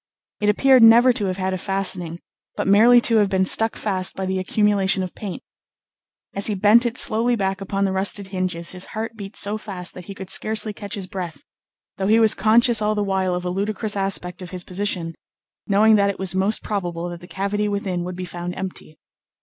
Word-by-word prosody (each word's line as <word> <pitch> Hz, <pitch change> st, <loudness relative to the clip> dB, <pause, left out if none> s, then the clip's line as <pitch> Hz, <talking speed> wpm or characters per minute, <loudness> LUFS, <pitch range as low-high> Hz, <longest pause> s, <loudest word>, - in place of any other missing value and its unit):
It 210 Hz, -, +1 dB
appeared 260 Hz, +4 st, +4 dB
never 235 Hz, +3 st, +7 dB
to 225 Hz, -4 st, -1 dB
have 185 Hz, -1 st, -2 dB
had 190 Hz, 0 st, -2 dB
a 185 Hz, -, -3 dB
fastening, 180 Hz, -4 st, -3 dB, 0.3 s
but -, -, -2 dB
merely 225 Hz, +5 st, +6 dB
to 230 Hz, -1 st, +4 dB
have 205 Hz, -2 st, +3 dB
been 190 Hz, -1 st, +1 dB
stuck 225 Hz, +4 st, +2 dB
fast 185 Hz, -3 st, -1 dB
by 190 Hz, -, -3 dB
the 190 Hz, 0 st, -2 dB
accumulation 195 Hz, -1 st, +1 dB
of 180 Hz, -, -6 dB
paint. 200 Hz, -4 st, -7 dB, 0.9 s
As 200 Hz, -, 0 dB
he 210 Hz, -, -1 dB
bent 210 Hz, +5 st, +4 dB
it 235 Hz, +2 st, -5 dB
slowly 235 Hz, +3 st, +2 dB
back 195 Hz, -2 st, -2 dB
upon 195 Hz, 0 st, -1 dB
the 195 Hz, -, -1 dB
rusted 190 Hz, +1 st, -1 dB
hinges 185 Hz, -3 st, -3 dB
his 185 Hz, 0 st, -5 dB
heart 225 Hz, +1 st, -4 dB
beat 200 Hz, -1 st, -9 dB
so 210 Hz, +2 st, -1 dB
fast 185 Hz, -4 st, -5 dB
that 180 Hz, -, -10 dB
he 195 Hz, -, -9 dB
could 190 Hz, -1 st, -6 dB
scarcely 215 Hz, 0 st, +1 dB
catch 205 Hz, -1 st, -6 dB
his 195 Hz, -3 st, -4 dB
breath, 175 Hz, -6 st, -7 dB, 0.6 s
though 190 Hz, -, -1 dB
he 220 Hz, +2 st, +4 dB
was 220 Hz, -1 st, +5 dB
conscious 230 Hz, 0 st, +3 dB
all 215 Hz, 0 st, 0 dB
the 210 Hz, -, 0 dB
while 190 Hz, -2 st, -1 dB
of 180 Hz, 0 st, -5 dB
a 180 Hz, -, -2 dB
ludicrous 205 Hz, +2 st, -2 dB
aspect 195 Hz, -2 st, -2 dB
of 180 Hz, -, -8 dB
his 180 Hz, 0 st, -6 dB
position, 180 Hz, -3 st, -3 dB, 0.5 s
knowing 215 Hz, +2 st, +4 dB
that 200 Hz, 0 st, +2 dB
it 200 Hz, -, -4 dB
was 190 Hz, -1 st, -1 dB
most 195 Hz, +3 st, +1 dB
probable 175 Hz, -4 st, -3 dB
that 175 Hz, -1 st, -8 dB
the 175 Hz, -, -13 dB
cavity 200 Hz, +3 st, -2 dB
within 195 Hz, -3 st, -2 dB
would 180 Hz, 0 st, -6 dB
be 185 Hz, 0 st, -5 dB
found 175 Hz, 0 st, -6 dB
empty. 185 Hz, -4 st, -8 dB
195 Hz, 215 wpm, -21 LUFS, 185-210 Hz, 0.9 s, never